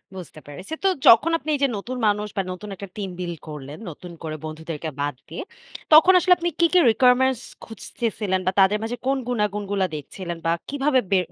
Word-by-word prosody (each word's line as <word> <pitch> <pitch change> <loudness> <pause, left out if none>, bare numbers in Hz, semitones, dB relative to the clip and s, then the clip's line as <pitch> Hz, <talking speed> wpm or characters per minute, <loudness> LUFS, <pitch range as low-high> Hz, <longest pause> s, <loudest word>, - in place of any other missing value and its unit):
বুঝতে 175 -4 -9
পেরেছি। 145 - -8
তো - - +4 0.2
যখন 285 +9 +7
আপনি 310 0 -8
এই - - -4
যে 275 - +5
নতুন 250 +6 -6
মানুষ 210 0 0
বা - - +3
নতুন 195 +3 -8
একটা 200 +2 -8
টিম 200 -2 -4
বিল্ড 175 -2 -4
করলেন, 145 0 -8
নতুন 175 +3 -10
করে 155 -1 -4
বন্ধুদেরকে 160 0 -6
বাদ 145 -1 -2
দিয়ে 160 - -6 0.5
তখন 325 +4 +8
আসলে 360 +1 +5
আপনি 345 0 -1
কি, 340 - +5
কি 365 - +6
requirements 255 +1 +3 0.2
খুঁজতেছিলেন 215 -3 -3
বা - - +4
তাদের 195 +2 +5
মাঝে 230 +2 -3
কোন 270 +1 +2
গুনাগুণগুলা 205 -4 -1
দেখছিলেন 170 +4 -6
বা 165 - +2 0.2
কিভাবে 280 -1 +2
বে 195 - +5
205 Hz, 190 wpm, -23 LUFS, 170-255 Hz, 0.5 s, তখন